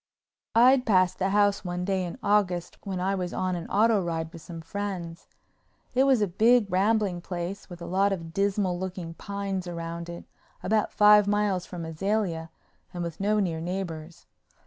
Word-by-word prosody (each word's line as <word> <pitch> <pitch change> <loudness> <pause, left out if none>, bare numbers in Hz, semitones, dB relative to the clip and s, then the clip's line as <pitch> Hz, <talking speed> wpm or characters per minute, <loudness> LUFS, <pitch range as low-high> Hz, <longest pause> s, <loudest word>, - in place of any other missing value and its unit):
I'd 250 +3 +6
passed 185 -3 +3
the 190 0 +1
house 205 0 +2
one 180 -1 -3
day 190 -1 0
in 175 +6 -5
August 185 -4 +1
when 190 -3 -4
I 190 +2 0
was 180 -2 -3
on 185 -1 -1
an 170 - -5
auto 215 0 +3
ride 165 -2 -3
with 165 - -10
some 165 +2 -9
friends. 175 -1 -5 0.7
It 260 +2 +4
was 260 -6 +4
a - - +1
big, 225 +6 +4
rambling 195 -1 +1
place 180 +3 -5
with 175 -1 -9
a - - -5
lot 195 +3 +2
of 165 -4 -4
dismal 195 -1 0
looking 180 -3 -5
pines 195 0 -4
around 170 0 -5
it, 170 0 -8 0.4
about 215 +2 +1
five 210 -1 +6
miles 205 -3 +1
from 175 -2 -6
Azalea 165 0 -2 0.4
and 175 -1 -4
with 170 -2 -6
no 210 +2 +2
near 170 -5 -1
neighbors. 170 -2 -5
185 Hz, 175 wpm, -27 LUFS, 170-205 Hz, 0.7 s, I'd